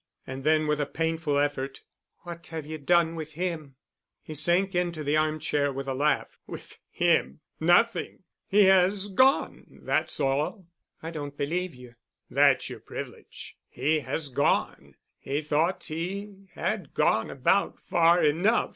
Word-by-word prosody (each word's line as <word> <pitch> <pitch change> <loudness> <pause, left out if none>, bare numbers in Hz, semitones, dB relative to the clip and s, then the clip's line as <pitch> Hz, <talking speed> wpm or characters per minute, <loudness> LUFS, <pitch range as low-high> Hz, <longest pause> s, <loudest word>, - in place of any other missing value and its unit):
And 130 0 -7
then, 155 +1 +3
with 150 0 0
a 145 - -1
painful 160 -2 -1
effort, 140 -2 -1 0.4
"What 170 -1 -9
have 160 -2 -6
you 155 +1 -6
done 165 +2 +3
with 155 -2 -7
him?" 160 -5 -4 0.5
He 155 - -8
sank 175 +6 +2
into 175 -3 -1
the 145 +1 +1
armchair 155 -2 0
with 135 0 -6
a 135 - -1
laugh. 145 +3 0
"With - - -10
him? 170 -2 +1 0.2
Nothing. 180 +5 +2 0.2
He 205 +1 +5
has 190 +1 +4
gone. 260 +7 +2 0.2
That's - - 0
all." 145 +8 -1 0.4
"I 165 - -5
don't 145 -3 -7
believe 170 +3 -2
you." 125 -1 -13 0.4
"That's - - +4
your - - -8
privilege. - - -9
He 150 +5 0
has 145 +2 -3
gone. 125 - 0 0.2
He 140 +3 -3
thought 155 +5 0
he 195 +5 -6
had 195 -9 -3
gone 110 - +2
about 140 +9 +1
far 170 +1 +3
enough. 175 +10 +2
160 Hz, 145 wpm, -27 LUFS, 145-180 Hz, 0.5 s, He